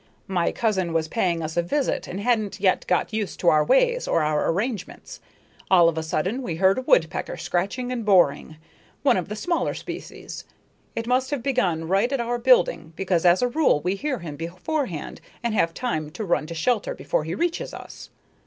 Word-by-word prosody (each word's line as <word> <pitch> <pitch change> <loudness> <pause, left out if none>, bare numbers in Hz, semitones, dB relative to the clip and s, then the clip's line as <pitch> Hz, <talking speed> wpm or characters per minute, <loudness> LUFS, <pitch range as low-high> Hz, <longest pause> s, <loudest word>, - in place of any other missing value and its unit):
My 180 -3 0
cousin 190 -7 0
was 160 -1 0
paying 170 -3 0
us 155 0 -4
a 175 - +3
visit 270 +11 -1
and 190 - -5
hadn't 215 -2 0
yet 190 -1 +2
got 180 +4 0
used 215 -3 -3
to 175 - +5
our 155 -1 +4
ways - - +2
or 165 - +2
our 150 0 +1
arrangements. 220 - -3 0.5
All 175 -3 +6
of 165 - +1
a 160 - -1
sudden 180 +10 -2
we 175 -10 -3
heard 190 +6 +3
a - - -3
woodpecker - - +1
scratching 205 +8 -2
and 245 -2 -3
boring 175 -7 +3 0.5
one 285 - +4
of 185 -1 -2
the 210 - -4
smaller 340 +10 -1
species. - - -8 0.5
It 230 - -3
must 255 +2 +1
have 285 -5 -3
begun 180 -12 0
right 195 +8 +2
at 275 - 0
our 240 0 -1
building 230 -10 +3
because 180 -2 +1
as 175 +7 +4
a - - +4
rule 265 - +2
we 180 +4 0
hear 265 +6 -2
him 160 -7 -7
beforehand 180 - -4 0.2
and 235 -2 0
have 170 -6 +2
time 155 -9 -3
to 220 - -4
run 170 -4 0
to 170 - -6
shelter 255 - 0
before - - -1
he - - -4
reaches 340 0 -2
us. - - -10
195 Hz, 200 wpm, -24 LUFS, 170-250 Hz, 0.5 s, All